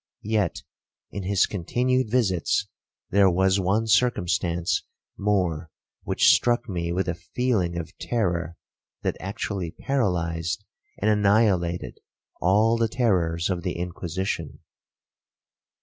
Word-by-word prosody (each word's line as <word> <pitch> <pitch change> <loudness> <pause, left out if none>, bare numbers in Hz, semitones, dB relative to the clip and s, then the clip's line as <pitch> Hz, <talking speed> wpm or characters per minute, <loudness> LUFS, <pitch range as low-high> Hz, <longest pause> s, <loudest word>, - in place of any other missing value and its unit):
Yet, 105 -5 0 0.5
in 100 - -4
his 95 0 +2
continued 125 +6 0
visits, 105 -3 +1 0.4
there 100 0 +5
was 95 +2 +2
one 100 +4 +1
circumstance 90 -7 +1 0.3
more, 90 -6 0 0.3
which - - +4
struck 120 0 +1
me 85 -4 -2
with 95 +2 -1
a 90 - 0
feeling 90 0 -1
of 85 -2 -6
terror 85 -8 -1 0.5
that - - 0
actually 95 -2 -4
paralyzed 85 - -1 0.3
and 110 +2 +2
annihilated 100 -4 +2 0.4
all 105 +6 +3
the 115 0 +2
terrors 90 -8 +1
of 90 -2 -2
the 90 -1 -2
Inquisition. 85 -2 -4
95 Hz, 110 wpm, -25 LUFS, 85-110 Hz, 0.5 s, there